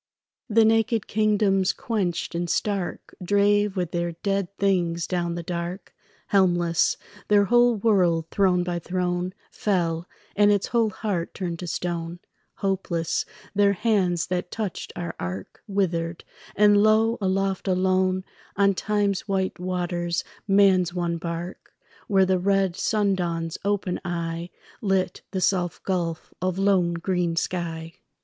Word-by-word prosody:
The 225 +1 +5
naked 225 0 +2
kingdoms 205 -3 +2
quenched 190 -8 -2
and 170 0 -2
stark 195 -1 -2
Drave 205 +1 +2
with 180 -3 -1
their 170 0 -1
dead 195 -2 0
things 175 -4 +1
down 175 -2 -1
the 170 - -4
dark, 175 +2 -5 0.4
Helmless; 175 -4 +3 0.3
their 205 -1 +5
whole 240 +2 +4
world, 185 -7 +2
throne 185 -3 +3
by 175 -1 -2
throne, 180 +1 -2 0.2
Fell, 170 -4 -1 0.3
and 205 0 +5
its 205 -2 +2
whole 230 -2 +2
heart 190 -4 -3
turned 170 -3 -4
to 180 - -5
stone, 170 0 -3 0.4
Hopeless; 185 -4 -1 0.3
their 200 0 +4
hands 185 -5 +1
that 180 0 -2
touched 210 -4 -4
our 170 -1 -4
ark 90 +2 -6
Withered; 170 -4 -1 0.3
and 205 0 +5
lo, 220 +2 +3
aloft, 195 0 0
alone, 185 0 +2 0.3
On 200 0 +4
time's 205 0 0
white 190 -2 -1
waters 175 -1 -2 0.2
man's 190 -3 +4
one 170 -1 -1
bark, 170 +2 -6 0.3
Where 195 -2 +4
the 185 -1 +2
red 195 -1 +2
sundawn's 180 -7 0
open 200 -2 -1
eye 170 0 -3 0.3
Lit 190 -3 0
the 190 -2 -3
soft 180 -2 0
gulf 170 -3 -2
of 185 0 -1
low 195 -3 +3
green 175 0 -1
sky. 165 -2 -3
185 Hz, 130 wpm, -25 LUFS, 175-200 Hz, 0.4 s, The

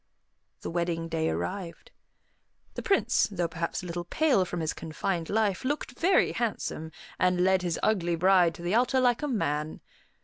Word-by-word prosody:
The - - -5
wedding 170 -1 -2
day 160 0 0
arrived. 190 - -5 0.8
The - - -5
Prince, 390 - +2
though 175 -3 -1
perhaps 170 +1 -4
a - - -7
little 175 0 -4
pale 260 - +2
from 175 0 -4
his 160 - -1
confined 165 +1 -3
life, 210 -1 +1
looked 285 0 -2
very 370 +3 +3
handsome, 205 -8 -3 0.3
and 180 -1 +2
led 190 0 +3
his 175 -3 -2
ugly 175 -5 +1
bride 180 -1 +4
to 170 - -10
the 175 +3 -1
altar 250 +3 +3
like 245 0 +2
a 295 - -1
man. 155 - -2
180 Hz, 170 wpm, -28 LUFS, 170-220 Hz, 0.8 s, bride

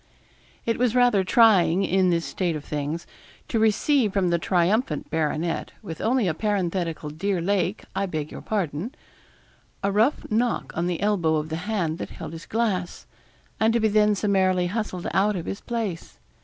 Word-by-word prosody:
It 230 0 0
was 250 -1 +2
rather 245 -6 +4
trying, 195 -4 +5
in 190 -1 +2
this 170 -1 +1
state 175 -4 -1
of 150 - -6
things, 150 +3 -3 0.4
to 225 - 0
receive 220 +1 +2
from 185 -3 +1
the 170 - +2
triumphant 175 - 0
baronet, 160 +1 -1
with 160 - -7
only 240 -2 +2
a 165 - +1
parenthetical 175 -5 -2
'Dear 185 +4 -1
Lake, 190 +2 0
I 195 +1 0
beg 155 -4 -4
your - - -8
pardon,' 200 - -3 0.9
a 200 - +1
rough 220 +8 +2
knock 235 +2 0
on 170 +2 0
the 175 -2 -2
elbow 190 -6 +2
of 155 0 -2
the 160 - -2
hand 175 -7 -1
that - - -5
held 165 -1 -8
his 165 0 -9
glass, 205 -6 -1 0.5
and 220 +1 +3
to 235 - +3
be 220 -1 +2
then 210 0 +4
summarily 190 -3 +2
hustled 185 -2 -3
out 205 +2 +2
of 175 - -4
his 195 - -5
place. 220 -8 -4
190 Hz, 175 wpm, -25 LUFS, 170-215 Hz, 0.9 s, trying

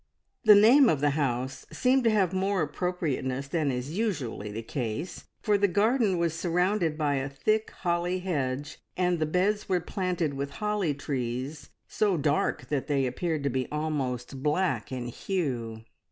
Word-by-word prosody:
The 215 -2 +9
name 235 +6 +7
of 150 - +2
the 145 +1 +2
house 135 -2 -2
seemed 260 +1 +2
to - - +6
have 195 -5 +2
more 190 -1 +1
appropriateness 145 -5 -2
than 155 0 0
is 130 +5 -3
usually 140 - -2
the 110 +2 -5
case, 125 +8 -4 0.2
for 210 -1 +3
the 200 - +4
garden 210 +1 +2
was 170 -2 +1
surrounded 175 0 0
by 145 -3 +1
a 135 +1 -2
thick 215 +11 0
holly 175 0 -1
hedge, 145 -6 -3 0.2
and 180 -2 +1
the 155 - +1
beds 195 +6 0
were 185 -1 +3
planted 175 -4 -2
with 140 +1 -4
holly 210 -8 0
trees 135 +1 -4 0.2
so 200 -4 +1
dark 145 -1 0
that 145 -3 -1
they 140 -2 +1
appeared 155 +3 -2
to 140 - 0
be 130 0 -1
almost 135 -4 -3
black 155 +4 0
in 125 -2 -4
hue. 120 - -3
155 Hz, 165 wpm, -28 LUFS, 135-185 Hz, 0.2 s, The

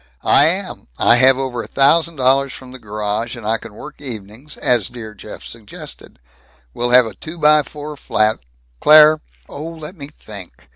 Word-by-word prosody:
"I - - +5
am. - - -3
I 120 - +4
have 130 +1 +5
over 130 -3 -3
a - - -9
thousand 160 +4 +2
dollars 135 0 +2
from 130 -1 -12
the 130 - -11
garage, 105 +2 -4
and 115 - -10
I 110 +1 0
can 115 -2 -12
work 150 +5 -11
evenings 115 +2 -8
as 120 -6 +1
dear 110 -3 -10
Jeff 105 0 -11
suggested! 110 -3 -12 0.6
We'd 120 +1 +1
have 125 -1 +7
a 110 - -7
two 155 - -10
by 150 -1 +4
four 150 +1 -9
flat 110 -5 0 0.4
Claire 155 0 +6
" - - -32
"Oh, 145 - -8
let 160 +2 -10
me 140 -5 -9
think. 100 - -12
125 Hz, 185 wpm, -18 LUFS, 110-150 Hz, 0.6 s, have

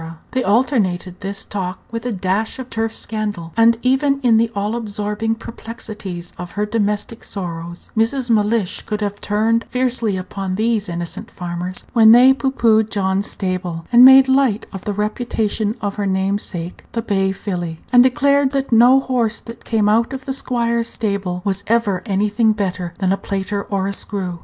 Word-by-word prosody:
They 260 0 0
alternated 200 -6 +1
this 195 0 -4
talk 185 -2 -4
with 230 +1 -4
a - - -1
dash 195 +2 -1
of 255 -1 -8
turf 225 0 -1
scandal; 210 -8 -4
and 230 0 +5
even 275 +2 +2
in 235 -4 +4
the 230 0 +2
all 205 +3 -1
absorbing 210 0 -2
perplexities 215 -6 -7
of 175 0 -7
her 210 +1 -1
domestic 210 +1 -2
sorrows 175 -3 -6
Mrs. 240 +3 +1
Mellish 210 -2 +1
could 210 0 -3
have 205 0 -3
turned 225 +2 +1
fiercely 245 -5 0
upon 185 0 -4
these 220 -1 0
innocent 170 0 -5
farmers 180 +1 -6
when 220 -1 +7
they 255 +3 +7
pooh 270 0 -1
poohed 220 -4 +3
John's 195 0 -1
stable, 180 -3 -3
and 240 +1 +8
made 265 +1 +9
light 265 -5 +2
of 195 - -8
the 205 - -1
reputation 215 0 -1
of 205 -1 -3
her 205 -1 -1
namesake 190 -2 -2
the 230 - -2
bay 195 -3 +1
filly, 175 -4 -4 0.2
and 245 - +8
declared 280 +2 +3
that 275 -1 -1
no 245 +3 +6
horse 240 -4 0
that 230 0 -11
came 220 -2 +1
out 230 +4 +2
of 265 0 -6
the 265 - -2
squire's 235 -3 -1
stables 195 -5 -3
was 200 0 -1
ever 215 -5 +1
anything 210 +3 +2
better 180 -4 -3
than 190 -2 0
a 195 - +2
plater 200 +1 -3
or 195 -2 -1
a 200 - -2
screw. 185 -4 -4
210 Hz, 175 wpm, -19 LUFS, 195-235 Hz, 0.2 s, made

